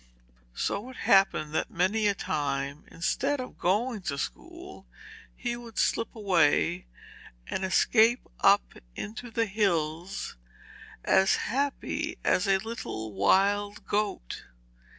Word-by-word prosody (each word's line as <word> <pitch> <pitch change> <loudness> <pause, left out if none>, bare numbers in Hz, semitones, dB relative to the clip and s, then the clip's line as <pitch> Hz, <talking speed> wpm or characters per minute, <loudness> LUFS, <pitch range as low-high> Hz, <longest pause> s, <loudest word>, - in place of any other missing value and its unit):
So 205 - -2
it 260 - -11
happened 170 -8 +3
that - - 0
many 205 +5 +1
a 200 - +2
time, 140 -4 -2
instead 270 +11 -1
of 255 - -7
going 215 +5 0
to 140 - -3
school, 345 - -7 0.5
he 240 -1 -3
would 235 -3 -11
slip 230 - 0
away 180 -3 +2 0.6
and 190 - -3
escape 225 +5 +3
up - - +4 0.2
into 225 +3 -6
the 230 0 0
hills, 175 - -1 0.7
as 190 0 +4
happy 285 - -2
as 185 - +2
a 195 -1 +4
little 190 - -6
wild 200 - +2
goat. 205 - -2
200 Hz, 115 wpm, -28 LUFS, 170-230 Hz, 0.7 s, up